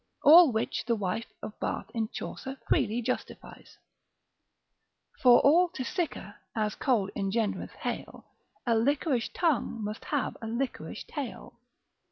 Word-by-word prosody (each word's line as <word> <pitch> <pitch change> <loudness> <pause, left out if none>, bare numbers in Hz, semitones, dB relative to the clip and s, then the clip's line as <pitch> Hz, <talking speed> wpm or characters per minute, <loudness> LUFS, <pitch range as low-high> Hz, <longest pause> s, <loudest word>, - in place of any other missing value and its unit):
All 320 0 +9
which 220 0 -2
the 235 - +2
wife 210 +2 -2 0.2
of 215 - -7
Bath - - -3
in 225 -2 -1
Chaucer 270 +1 -6
freely 230 +3 +1
justifies, 255 +2 -6 1.4
For 245 -2 +8
all 345 +5 +5
to 260 - -3
sicker, 275 - -4 0.2
as 215 -1 0
cold 225 -8 0
engendreth 205 +2 -1
hail, - - -6 0.4
A 235 - +2
liquorish 260 +2 +1
tongue 275 -9 0
must 210 +1 -5
have 290 -3 -1
a 225 - -5
liquorish 240 +4 -4
tail. 275 -5 -7
235 Hz, 130 wpm, -29 LUFS, 220-280 Hz, 1.4 s, All